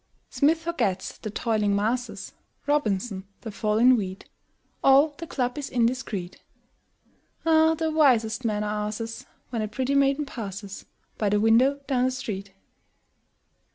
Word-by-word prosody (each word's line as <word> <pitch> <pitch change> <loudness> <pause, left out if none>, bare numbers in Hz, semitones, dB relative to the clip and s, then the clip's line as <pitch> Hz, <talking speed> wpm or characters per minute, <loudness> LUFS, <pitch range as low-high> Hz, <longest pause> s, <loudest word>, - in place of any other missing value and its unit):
Smith 290 +5 +3
forgets 235 - -2
the 215 - -5
"toiling 210 -1 0
masses," 230 +5 -2 0.3
Robinson, 215 -9 0 0.2
the 225 - -6
fall 210 +1 -1
in 250 +3 +6
wheat; 190 -4 -4 0.6
All 275 +3 +6
the 335 - -6
club 250 -1 -2
is 285 - -5
indiscret. 230 -7 -1 1.1
Ah, 320 0 +4
the 320 0 -1
wisest 255 -7 +3
men 210 -2 0
are 210 0 -2
asses 225 +2 -6 0.2
When 230 -3 -2
a 215 - -1
pretty 260 +6 -2
maiden 280 +1 +2
passes 200 -6 -7 0.3
By 210 - +1
the 205 +1 +2
window 250 +6 +4
down 255 -3 +1
the - - +2
street! 205 -6 -5
235 Hz, 140 wpm, -25 LUFS, 210-275 Hz, 1.1 s, in